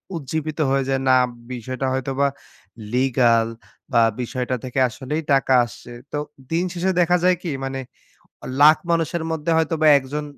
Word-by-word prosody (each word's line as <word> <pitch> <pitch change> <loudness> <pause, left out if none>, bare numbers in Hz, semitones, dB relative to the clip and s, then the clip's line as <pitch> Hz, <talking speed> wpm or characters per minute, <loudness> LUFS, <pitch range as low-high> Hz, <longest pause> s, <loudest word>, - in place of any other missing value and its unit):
উজ্জীবিত 155 +1 -4
হয়ে 135 0 +1
যায়, 135 0 0
না 130 - +6 0.4
বিষয়টা 130 +2 -4
হয়তোবা 135 +1 0 0.7
লিগাল 120 -3 +3 0.4
বা 115 - +4 0.2
বিষয়টা 125 +1 -3
থেকে 130 +1 -3
আসলেই 145 +7 -4
টাকা 135 -1 +2
আসছে। 120 +1 -12 0.2
তো 150 - -2 0.3
দিন 165 +2 +1
শেষে 185 +2 0
দেখা 180 +1 +3
যায় 180 0 +4
কি 170 - -3
মানে, 135 0 -3 0.8
লাখ 155 +2 +8
মানুষের 165 0 0
মধ্যে 160 0 -2
হয়তোবা 160 -1 +1
১ 135 - -10
জন 150 0 -2
135 Hz, 150 wpm, -22 LUFS, 130-160 Hz, 0.8 s, লাখ